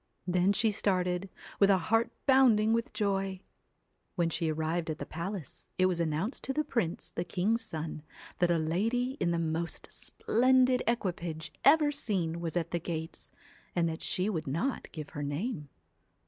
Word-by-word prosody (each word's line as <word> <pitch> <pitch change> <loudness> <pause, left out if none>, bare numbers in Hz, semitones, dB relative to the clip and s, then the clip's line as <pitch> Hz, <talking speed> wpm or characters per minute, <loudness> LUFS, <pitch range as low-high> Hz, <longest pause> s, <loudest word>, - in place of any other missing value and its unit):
Then 180 +1 +3
she 220 +2 +2
started, 185 -2 0 0.3
with 200 - +6
a 195 - +6
heart 225 +6 +2 0.2
bounding 235 -5 +5
with 230 0 0
joy. 195 -2 -1 0.8
When 170 -3 +1
she 160 +1 0
arrived 160 +2 -1
at 155 - -2
the - - -5
palace, 170 -2 -6
it 185 - +4
was 180 -2 +1
announced 165 - -1
to 270 - -1
the 305 - +1
prince, 225 - -2
the 170 - -2
king's 195 +6 0
son, 160 -7 -5 0.4
that 175 - +3
a 170 - +3
lady 220 +11 0
in - - +1
the 170 - +1
most 165 +1 -2
splendid 255 +1 +2
equipage 170 -8 -2
ever 295 +1 +6
seen 185 - -1
was 170 0 -2
at 165 - -2
the 175 - 0
gates, 160 0 -5 0.4
and 170 -1 +2
that 160 +1 -5
she 185 +2 0
would 165 -8 -2
not 170 - -2
give 155 -3 -7
her 145 - -5
name. 150 - -3
180 Hz, 170 wpm, -31 LUFS, 165-225 Hz, 0.8 s, with